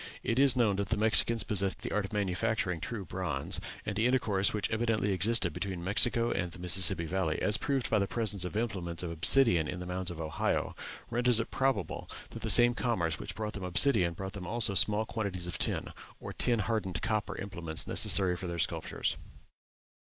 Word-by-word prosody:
It 115 - 0
is 135 -2 +5
known 110 -6 +2
that 100 -1 -2
the 110 - 0
Mexicans 110 +1 +2
possessed 100 -3 -1
the - - -3
art 105 -1 0
of - - -9
manufacturing 100 -2 -1
true 100 +5 -5
bronze; 90 -5 -3 0.2
and - - -3
the 110 +3 +2
intercourse 105 -6 +1
which 105 -1 -1
evidently 115 -2 0
existed 95 -1 +1
between 95 -2 -4
Mexico 115 +5 +2
and 90 -1 -2
the - - -9
Mississippi 90 -1 +4
Valley, 85 -2 -1
as 105 +1 +3
proved 140 -3 -1
by 110 - +2
the 100 - 0
presence 105 -3 -1
of 90 +3 -4
implements 90 -7 -3
of 85 - -4
obsidian 85 - +4
in 90 - -5
the 90 - -6
mounds 90 0 -3
of 85 -2 -7
Ohio, 80 -2 -2 0.4
renders 120 -1 +3
it 115 - -3
probable 130 -10 -1 0.2
that - - -8
the - - -3
same 120 0 +6
commerce 90 -11 -1
which - - -7
brought 105 -1 -4
them 100 - -6
obsidian 90 -2 +2
brought 95 +1 -6
them 95 -3 -7
also 115 -2 +1
small 105 +3 +4
quantities 100 -7 -3
of 90 - -5
tin, - - -1 0.3
or - - -7
tin 120 -3 +1
hardened 100 -6 -2
copper 110 -2 -1
implements 85 -5 -5
necessary 95 -3 +2
for 90 +1 -6
their 85 0 -4
sculptures. 80 - -2
100 Hz, 200 wpm, -30 LUFS, 90-115 Hz, 0.4 s, same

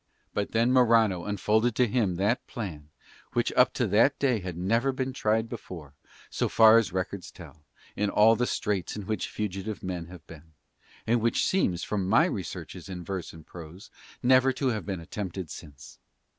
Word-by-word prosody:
But 100 - -2
then 115 +2 +2
Morano 115 -8 +3
unfolded 105 +3 +1
to 125 - +3
him 105 -6 0
that 105 +7 0
plan 80 -10 -7 0.4
which - - 0
up - - +4
to - - 0
that - - +4
day 130 -5 +1
had 90 -3 -6
never 115 +9 +1
been 130 0 -3
tried 110 -2 0
before, 90 - -9 0.4
so - - -1
far 110 0 +7
as 115 - -2
records 95 +1 -4
tell, 75 - -14 0.3
in 105 0 0
all 110 +3 +5
the 120 +1 0
straits 100 -4 -2
in 105 -2 -6
which 110 +2 -3
fugitive 105 0 -4
men 90 -3 -4
have 90 -2 -13
been; 80 0 -14 0.5
and 115 +1 +2
which 115 +1 +1
seems 95 - +1
from 100 -3 -2
my 115 - +5
researches 90 -1 -6
in 90 -2 -6
verse 95 -2 -5
and 80 -2 -14
prose 85 +2 -11 0.3
never 130 +1 +5
to 130 0 -1
have 110 -4 -3
been 95 -3 -3
attempted 90 -1 -6
since. 70 -3 -12
100 Hz, 180 wpm, -27 LUFS, 90-115 Hz, 0.5 s, far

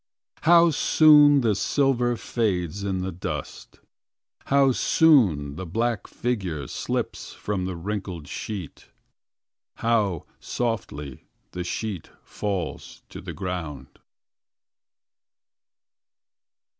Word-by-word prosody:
How 170 0 +7
soon 150 -1 +6
the 110 -3 +2
silver 120 +2 +1
fades 100 -5 -2
in 95 -2 -1
the 95 - -3
dust! 90 +1 -6 0.7
How 140 -1 +4
soon 100 - +3
the 95 - -5
black 115 +5 -1
figure 95 - -3
slips - - -4
from 100 -3 -3
the 95 -1 -4
wrinkled 90 -3 -5
sheet 100 -7 -7 0.9
How 105 -8 0
softly 95 - -4 0.2
the 90 - -4
sheet 100 -1 -4 0.2
falls 95 -6 -4
to - - -9
the - - -7
ground 80 -8 -6
100 Hz, 95 wpm, -25 LUFS, 90-120 Hz, 0.9 s, How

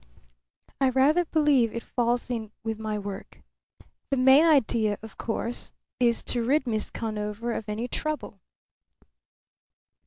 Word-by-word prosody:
I 270 -1 +4
rather 285 +7 +3
believe 290 -8 +2
it 230 - -4
falls 240 +1 -1
in 220 -3 -4
with 225 -1 -3
some 220 - -8
of - - -1
my 210 - -1
work. 200 -1 -8 0.7
The 275 - +1
main 265 +4 +7
idea, 230 -9 +3
of 220 - -10
course, 235 +1 -2 0.3
is 235 -2 +2
to 240 -2 0
rid 275 +4 +2
Miss 220 -3 -2
Conover 215 +1 -4
of 215 -1 -5
any 220 +3 -2
trouble." 300 -7 -4
235 Hz, 145 wpm, -27 LUFS, 220-265 Hz, 0.7 s, main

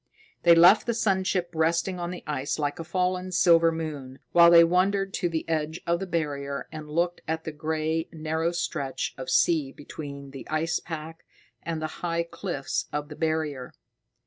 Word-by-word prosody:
They 170 -1 +7
left 175 +8 +7
the 235 - 0
sun 195 -4 +1
ship 175 -2 -1
resting 165 +3 0
on 175 0 -3
the 180 - -7
ice 145 -2 -2
like 145 0 -2
a - - -3
fallen 180 +2 -1
silver 170 -2 +5
moon, 150 -5 -5
while 170 0 +7
they 170 0 +9
wandered 195 +3 +1
to 175 - 0
the 160 -1 -3
edge 160 0 -1
of 170 0 +1
the 195 - -4
Barrier 140 -5 -3
and 155 -1 -8
looked 170 +3 0
at 160 0 -2
the 160 - -4
gray, 160 +1 -2
narrow 160 +1 -1
stretch 140 -5 -3
of 130 -1 -7
sea 150 -2 +3
between 140 -1 -9
the 135 -1 -9
ice 160 +1 0
pack 160 -1 -8 0.4
and 165 -1 -3
the 155 - -6
high 170 -1 0
cliffs 170 -4 -3
of 150 0 -3
the 150 - -8
Barrier. 155 -5 -2
165 Hz, 180 wpm, -26 LUFS, 150-175 Hz, 0.4 s, they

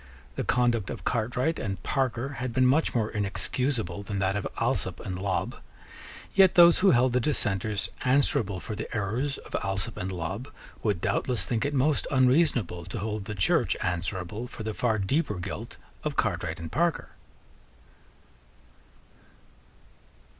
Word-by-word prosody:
The - - -2
conduct 120 -5 +1
of - - -6
Cartwright 125 +6 0
and 95 -3 -4
Parker 130 -1 0
had 125 -2 -3
been 130 +1 +3
much 140 +4 +3
more 110 -2 +1
inexcusable 105 -1 -1
than 100 0 -4
that 95 0 +1
of 105 - -1
Alsop - - 0
and 90 -1 -5
Lobb. 95 0 -2 0.7
Yet 190 -2 +6
those 170 -1 +8
who 195 - +5
held 125 -2 +4
the 125 - +3
dissenters 105 -6 0
answerable 125 -7 +2
for 110 - -6
the 110 - -6
errors 120 +8 -1
of - - -13
Alsop 95 +3 -2
and 95 +1 -3
Lobb 95 +8 -4 0.3
would 100 -5 0
doubtless 120 -8 +1
think 115 +6 -1
it 145 0 -1
most 140 +2 +2
unreasonable 130 - +2
to 115 - -6
hold 105 -1 -3
the 105 0 -5
Church 90 - +2
answerable 90 +5 -3
for 115 - -8
the 110 0 -3
far 110 0 +1
deeper 105 +4 0
guilt 90 - -6 0.3
of - - -2
Cartwright 80 +3 -1
and 80 -2 -7
Parker. 170 -1 0
110 Hz, 150 wpm, -27 LUFS, 95-130 Hz, 0.7 s, those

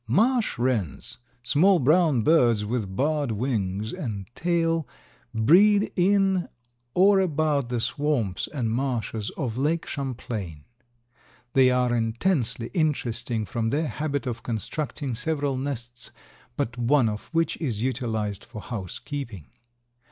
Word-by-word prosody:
Marsh 225 - +2
wrens, 120 - -2 0.2
small 175 +10 +4
brown 150 -3 +3
birds, 120 -9 +4
with 105 -4 -3
barred 145 0 0
wings 110 -3 -2
and 105 -7 -5
tail, 165 -1 0 0.4
breed 195 - +5
in 190 -1 +2 0.5
or 195 +2 +6
about 155 -7 +1
the 120 -1 -1
swamps 120 -7 -1
and 125 -6 -1
marshes 115 -4 -2
of 125 -5 -2
Lake 155 +4 0
Champlain. 115 - -5 0.9
They 130 -1 +6
are 125 -1 +2
intensely 115 +1 0
interesting 120 - 0
from 115 0 -2
their 150 +5 0
habit 145 -2 -2
of 120 -2 -4
constructing 130 - -3
several 145 +2 -1
nests 125 -3 -5 0.5
but 115 +2 -2
one 120 +1 +3
of 105 -1 -4
which 165 -1 0
is 120 -9 -2
utilized 110 -6 -2
for 110 - -9
housekeeping. 110 - -6
130 Hz, 120 wpm, -25 LUFS, 115-155 Hz, 0.9 s, or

